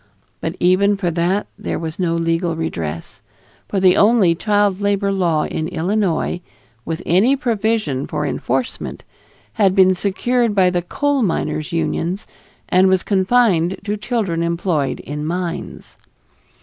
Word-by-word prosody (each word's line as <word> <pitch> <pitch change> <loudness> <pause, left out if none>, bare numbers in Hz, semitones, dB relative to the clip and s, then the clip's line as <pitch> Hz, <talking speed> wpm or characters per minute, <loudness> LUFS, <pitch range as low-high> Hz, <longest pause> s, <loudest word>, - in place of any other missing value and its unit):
But - - -3
even 195 +3 +3
for 180 -3 -1
that 175 +5 0
there - - -3
was 160 0 -6
no 170 -2 +1
legal 165 0 0
redress, 85 - -5 0.5
for 200 - 0
the 185 -1 +5
only 205 -5 +4
child 205 +1 +1
labor 200 0 +1
law 170 -5 +1
in 155 - -3
Illinois, 180 0 -1 0.4
with 165 0 -4
any 205 +11 +4
provision 220 - -1
for 150 -1 -2
enforcement, 130 -2 -3 0.5
had 195 -3 +2
been 185 -1 +6
secured 220 +4 0
by 185 -2 +4
the 175 -1 0
coal 285 +10 0
miners' 165 -6 -1
unions, 170 +3 -2 0.4
and 185 +1 +4
was 190 -1 +2
confined 190 -3 +2
to 205 0 -2
children 210 -6 -2
employed 170 -4 -1
in 150 +1 -5
mines. 170 +2 -5
185 Hz, 135 wpm, -19 LUFS, 165-205 Hz, 0.5 s, been